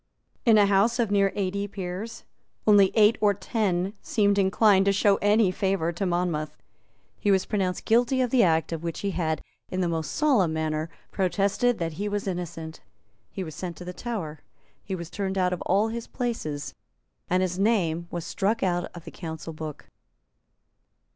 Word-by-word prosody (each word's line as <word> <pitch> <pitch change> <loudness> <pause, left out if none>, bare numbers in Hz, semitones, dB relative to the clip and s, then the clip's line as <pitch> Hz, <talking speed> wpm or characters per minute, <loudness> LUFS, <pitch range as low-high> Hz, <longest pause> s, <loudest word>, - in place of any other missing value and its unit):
In 225 -2 +7
a 205 - +6
House 200 +4 +3
of 230 -4 0
near 200 -1 +3
eighty 200 0 -1
peers 195 +3 -6 0.4
only 205 -3 +6
eight 215 +1 +5
or 205 -1 +4
ten 190 -2 -1
seemed 205 -2 +2
inclined 195 0 +4
to 200 - +4
show 195 0 +3
any 205 -1 +3
favour 190 -3 0
to 185 +3 -2
Monmouth. 170 -4 -1 0.6
He 205 - 0
was 190 -2 +3
pronounced 190 -4 -1
guilty 245 +3 +3
of 250 -2 +1
the 255 - +5
act 165 -4 +2
of 165 -1 -3
which 170 -1 -4
he 200 - -1
had, 160 -3 -1 0.3
in 185 - -3
the 180 - +1
most 160 -2 -2
solemn 245 - +3
manner, 155 0 -2 0.2
protested 200 +5 +1
that 165 -1 -3
he 205 +6 -3
was 205 -1 -3
innocent; 170 -3 -5 0.5
he 190 - -5
was 160 -3 -7
sent 175 +2 -6
to 180 - -9
the 180 - -6
Tower; 180 -10 -5 0.4
he 190 - -4
was 170 -2 -7
turned 195 0 -3
out 180 -1 +2
of 180 - -4
all 205 +4 +3
his 230 0 -5
places; 190 - -3 0.6
and 185 +1 +2
his 180 0 -2
name 175 -6 +1
was 175 -2 -5
struck 210 +3 0
out 175 -2 +1
of 170 - -10
the - - -8
Council 160 -1 -7
Book. 155 -1 -7
190 Hz, 180 wpm, -26 LUFS, 170-205 Hz, 0.6 s, In